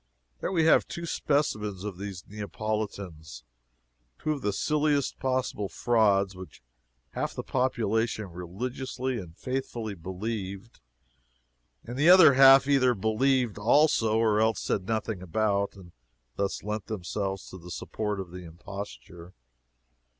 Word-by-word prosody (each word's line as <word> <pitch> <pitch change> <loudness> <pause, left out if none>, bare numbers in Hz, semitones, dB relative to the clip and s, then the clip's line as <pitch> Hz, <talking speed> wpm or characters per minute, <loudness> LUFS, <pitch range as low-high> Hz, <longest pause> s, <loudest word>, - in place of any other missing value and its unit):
There - - -2
we 165 -4 +2
have 160 - +5
two 170 - -6
specimens 105 - -1
of 100 -4 -6
these 100 -3 -6
Neapolitans 100 -6 -5 0.7
two 155 - -2
of 145 -3 -3
the 105 - 0
silliest 150 +4 0
possible 130 -6 -1
frauds, 100 -5 +2
which 90 -8 -11 0.5
half - - -3
the - - -4
population 115 -4 0
religiously 125 +8 -4
and 85 -4 -10
faithfully 120 -4 -4
believed, 95 +3 -6 1.0
and 120 +2 -7
the 155 +4 +5
other 180 -6 +9
half 135 0 +8
either 130 -3 +4
believed 110 +2 +1
also 115 -2 +3
or 110 -2 +3
else 110 0 +2
said 95 -2 -2
nothing 110 -3 -2
about, 100 +3 0
and 90 -3 -14 0.4
thus 100 -1 -2
lent 105 -1 -4
themselves 95 -1 -4
to 95 - -9
the 90 +1 -12
support 105 +3 -3
of 95 -3 -6
the 90 0 -8
imposture. 85 -1 -9
110 Hz, 130 wpm, -28 LUFS, 95-130 Hz, 1.0 s, other